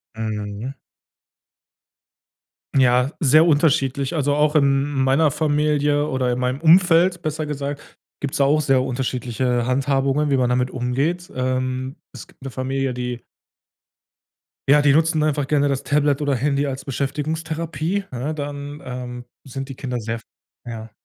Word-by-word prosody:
Mhm. 110 +2 -4 2.0
Ja, 125 +1 +4
sehr 155 +2 +5
unterschiedlich. 145 -3 +2
Also, 145 -2 +1
auch 150 +1 +2
in 140 -2 +4
meiner 135 +3 +3
Familie 150 0 +1
oder 130 -2 0
in 120 - -1
meinem 125 +2 -1
Umfeld, 175 +1 +5
besser 155 -1 -3
gesagt, 145 0 -6 0.2
gibt's 140 -1 -2
da 140 - +4
auch 150 +2 +3
sehr 135 -3 +3
unterschiedliche 125 -1 -1
Handhabungen, 135 +2 +1
wie 135 - +3
man 125 -1 +2
damit 125 +1 +1
umgeht, 140 +9 -1
ähm. 130 +1 -2 0.2
Es - - -10
gibt - - -24
'ne 135 - -5
Familie, 130 +1 -2
die 125 -1 -4 1.5
ja, 145 +1 +6
die 140 -1 +5
nutzen 160 0 +2
einfach 145 -2 0
gerne 145 0 +2
das 135 -1 -1
Tablet 145 0 +1
oder 145 -2 +1
Handy 140 +2 0
als 135 0 -5
Beschäftigungstherapie, 155 +6 -2
ne, 130 +5 -3
dann, 145 0 -6
ähm, 125 -1 -6 0.2
sind 135 +1 -6
die 135 - -7
Kinder 125 -2 -4
sehr 115 +1 -4 0.5
ja. 115 -1 -7
140 Hz, 145 wpm, -21 LUFS, 130-150 Hz, 2.0 s, ja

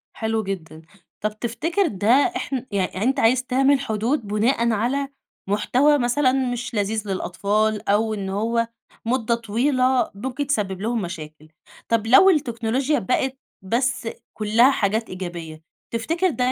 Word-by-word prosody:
حلو 220 -1 -1
جدًا. 170 -5 -6 0.4
طَب 215 0 -3
تفتكر 330 - 0
ده 205 -4 -3
احن 275 -1 +2
يعني 195 -2 -1
أنت 265 +3 +1
عايز 250 +3 +3
تعمل 270 +2 +3
حدود 225 0 -1
بناءً 230 +3 +1
على 255 +6 0 0.4
محتوى 255 +8 +3
مثلًا 255 +2 +2 0.2
مش 240 -1 -4
لذيذ 210 +1 -1
للأطفال، 205 +3 -1
أو 215 +2 +2
إن 195 -2 -4
هو 230 +4 0 0.4
مدة 235 -1 +1
طويلة 255 +3 +1
ممكن 260 +6 -4
تسبب 195 -9 -1
لهم 230 +1 -1
مشاكل. 155 -4 -8 0.4
طَب 225 -1 +1
لو 265 +11 +7
التكنولوچيا 260 0 0
بقِت 260 +6 -1 0.2
بس 240 +4 -1 0.3
كُلّها 225 +5 +4
حاجات 220 -1 0
إيجابية، 170 -4 -7 0.3
تفتكر 330 +11 0
ده 255 -5 0
230 Hz, 135 wpm, -22 LUFS, 205-260 Hz, 0.4 s, لو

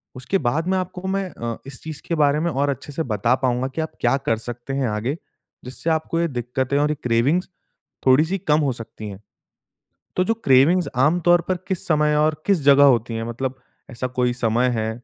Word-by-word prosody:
उसके 130 +10 -1
बाद 160 +8 0
में 190 0 +1
आपको 185 0 -4
मैं 195 -1 -1
अ, 115 -1 -5
इस 135 -3 -10
चीज़ 155 -2 -7
के 170 - 0
बारे 145 +1 +3
में 170 +1 0
और 140 +1 0
अच्छे 140 +1 -5
से 160 - -1
बता 115 +5 +2
पाऊँगा 125 +1 0
कि 160 - -1
आप 160 - -4
क्या 135 - +3
कर 115 - +2
सकते 120 +3 -6
हैं 135 -2 0
आगे, 115 +9 -2 0.5
जिससे 130 +6 -4
आपको 160 +1 0
ये 170 - +1
दिक्कतें 130 +1 -2
और 150 +1 +2
ये - - -1
क्रेविंग्स 125 +11 +1 0.6
थोड़ी 130 +4 +6
सी 190 +4 -2
कम 155 -4 +2
हो 140 -3 +1
सकती 110 -2 -8
है। 100 0 -9 1.0
तो 185 - +3
जो 225 - +1
क्रेविंग्स 140 +5 +4
आम 150 +7 +3
तौर 175 0 +6
पर 185 - +1
किस 190 -2 -2
समय 150 -1 +3
और 155 0 +1
किस 195 -5 +3
जगह 140 0 +7
होती 120 -3 +3
हैं? 115 - -3
मतलब 130 +3 -4 0.3
ऐसा 125 +2 -4
कोई 125 -1 +2
समय 120 +1 +1
है 110 0 -1
140 Hz, 215 wpm, -22 LUFS, 125-160 Hz, 1.0 s, जगह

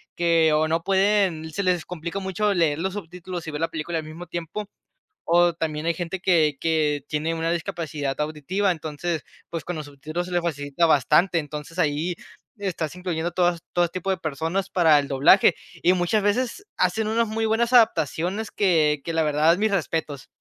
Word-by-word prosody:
que, 165 -2 +3
o 155 +1 +2
no 165 +1 +1
pueden, 190 -4 +2
se 200 - -2
les 180 -3 +1
complica 175 +2 -5
mucho 200 +2 0
leer 160 -4 +1
los 190 +2 -2
subtítulos 180 -2 -7
y - - -3
ver 150 - -4
la 165 - +1
película 165 +1 -4
al 160 - -3
mismo 165 +3 -9
tiempo, 175 +5 -5 0.6
o 175 +1 +4
también 155 -2 -3
hay 170 - +3
gente 175 +2 -4
que 160 -6 +3
que 150 -3 +1
tiene 155 +2 -1
una 165 0 -1
discapacidad 155 -4 -3
auditiva. 155 +6 0
Entonces, 160 0 -4 0.3
pues, 165 -2 -4
con 175 - -4
los 155 - -5
subtítulos 155 +5 -5
se 180 - -8
le 175 - +2
facilita 145 0 0
bastante. 160 +4 +3
Entonces, 150 +2 -7
ahí 160 +2 0 0.4
estás 175 -6 -3
incluyendo 175 -2 -2
todas 175 -1 +1
todo 175 -1 +3
tipo 185 +2 -6
de 190 - +1
personas 165 +4 -2
para 160 -5 +5
el 140 -1 -2
doblaje 145 +8 +5 0.3
y 180 - +5
muchas 185 +4 +1
veces 250 - -1
hacen 200 +4 +1
unas 230 +1 +1
muy 225 +1 -1
buenas 230 +2 +1
adaptaciones 200 - +2
que 155 -7 +2
que 165 - -3
la 165 0 +1
verdad, 155 +2 +3
mis 215 +1 +1
respetos. 155 -6 -2
170 Hz, 185 wpm, -24 LUFS, 155-185 Hz, 0.6 s, para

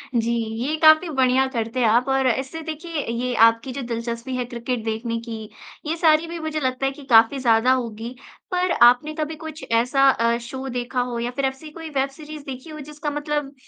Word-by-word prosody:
जी, 235 0 +1 0.3
ये 305 +3 0
काफ़ी 315 +2 +6
बढ़िया 260 0 +4
करते 230 -1 -3
हो 225 - +4
आप 240 +3 +3
और 270 -1 +2
ऐसे 265 +6 -2
देखिए 315 -1 -4
ये 250 +1 -1
आपकी 230 +3 -1
जो 275 - -4
दिलचस्पी 235 +1 -4
है 250 -1 -2
क्रिकेट 240 -1 -4
देखने 230 +1 -2
की, 225 -2 -7 0.4
ये 315 +2 -1
सारी 320 0 +4
भी 335 0 -6
मुझे 315 -1 -3
लगता 260 -1 -1
है 270 - +1
कि 280 +1 -12
काफ़ी 230 +3 +5
ज़्यादा 235 0 +3
होगी। 235 -1 -4 0.4
पर 360 0 +1
आपने 250 +6 +5
कभी 310 0 -3
कुछ 315 -1 -8
ऐसा 250 +4 +2
अ, 235 -2 +2
शो 260 +3 -7
देखा 245 0 -2
हो 240 -1 -3
या 240 +1 -2
फिर 275 +1 -2
ऐसी 265 +4 -4
कोई 325 0 -8
वेब 275 -2 0
सीरीज़ 300 +1 -10
देखी 260 +3 -8
हो 305 -1 -8
जिसका 300 +1 -5
मतलब 295 -1 -3
265 Hz, 205 wpm, -23 LUFS, 235-300 Hz, 0.4 s, काफ़ी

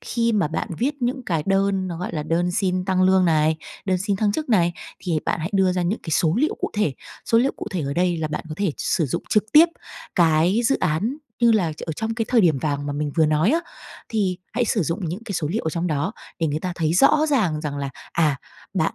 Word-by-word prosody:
khi 230 -1 0
mà 200 -8 +2
bạn 160 - -3
viết 280 +1 -1
những 255 +2 -1
cái 165 -4 0
đơn 195 -1 +1
nó, 170 - -4
gọi 180 - -4
là, 155 - -2
đơn 170 +3 0
xin 185 0 0
tăng 185 -1 +1
lương 185 0 +4
này, 155 -1 +3 0.3
đơn 185 -1 +1
xin 200 +2 -1
thăng 205 0 +1
chức 310 +5 -3
này, 175 -7 +3 0.3
thì 165 -4 -1
bạn - - 0
hãy 165 +4 -3
đưa 190 -2 +3
ra 180 0 0
những 180 +6 -1
cái 160 - -6
số 160 +2 +2
liệu 305 - +1
cụ - - -2
thể. 205 -10 0 0.3
Số 230 - +3
liệu 265 +3 +2
cụ - - -6
thể 185 - -2
ở 140 0 -3
đây 175 +1 +1
là 155 -1 -2
bạn 150 - -4
có 155 - -5
thể 200 -6 0
sử 160 -5 0
dụng - - -3
trực 210 - +3
tiếp 315 +3 +8 0.5
cái 170 +5 +3
dự 275 +4 +2
án 180 - 0 0.2
như 235 -1 +5
là 180 -7 +1
ở 160 - -2
trong 220 +7 -3
cái 225 0 -1
thời 245 -2 +4
điểm 165 -8 +3
vàng 145 0 -2
mà 145 - -2
mình 145 0 -2
vừa 160 -2 +4
nói 155 +6 +2
á, 330 +4 +2 0.5
thì 195 -5 0
hãy 245 +2 +1
sử 215 -3 +1
dụng 165 +4 -2
những 190 +8 -5
cái 210 - -5
số 165 -5 -1
liệu 210 +8 -2
ở 160 - 0
trong 170 +2 -2
đó 160 +4 -1 0.3
để 165 - +1
người 150 0 -2
ta 180 +1 -3
thấy 160 -2 0
rõ 300 - +5
ràng 185 - +1
rằng 150 -2 -4
là, 140 -1 -3 0.2
à, 155 -4 +2 0.4
bạn - - 0
180 Hz, 260 wpm, -23 LUFS, 160-215 Hz, 0.5 s, tiếp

